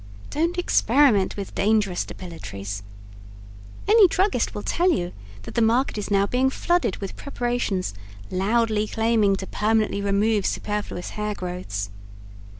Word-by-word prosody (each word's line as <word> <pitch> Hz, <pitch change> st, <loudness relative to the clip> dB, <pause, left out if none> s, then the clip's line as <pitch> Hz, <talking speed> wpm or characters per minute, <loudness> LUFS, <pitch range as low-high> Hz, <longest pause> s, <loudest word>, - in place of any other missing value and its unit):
Don't 335 Hz, +4 st, 0 dB
Experiment 245 Hz, -, +3 dB
With 200 Hz, -2 st, -6 dB
Dangerous 205 Hz, -3 st, +1 dB
Depilatories 100 Hz, -, -7 dB, 1.1 s
Any 425 Hz, -2 st, +7 dB
druggist 380 Hz, +3 st, 0 dB
will -, -, -4 dB
tell 355 Hz, +2 st, +2 dB
you 175 Hz, -, -1 dB, 0.3 s
that -, -, -8 dB
the 235 Hz, -, +1 dB
market 235 Hz, +4 st, +2 dB
is 205 Hz, -, -4 dB
now 200 Hz, -1 st, +3 dB
being 255 Hz, +5 st, +2 dB
flooded 345 Hz, -, 0 dB
with 195 Hz, -2 st, -6 dB
preparations 240 Hz, -, -2 dB, 0.4 s
loudly 215 Hz, +2 st, +1 dB
claiming 220 Hz, -3 st, +2 dB
to 190 Hz, -, -5 dB
permanently 215 Hz, 0 st, +1 dB
remove 200 Hz, +1 st, +2 dB
superfluous 205 Hz, -4 st, -3 dB
hair 210 Hz, 0 st, -3 dB
growths. 175 Hz, -, -4 dB
210 Hz, 130 wpm, -24 LUFS, 190-245 Hz, 1.1 s, Any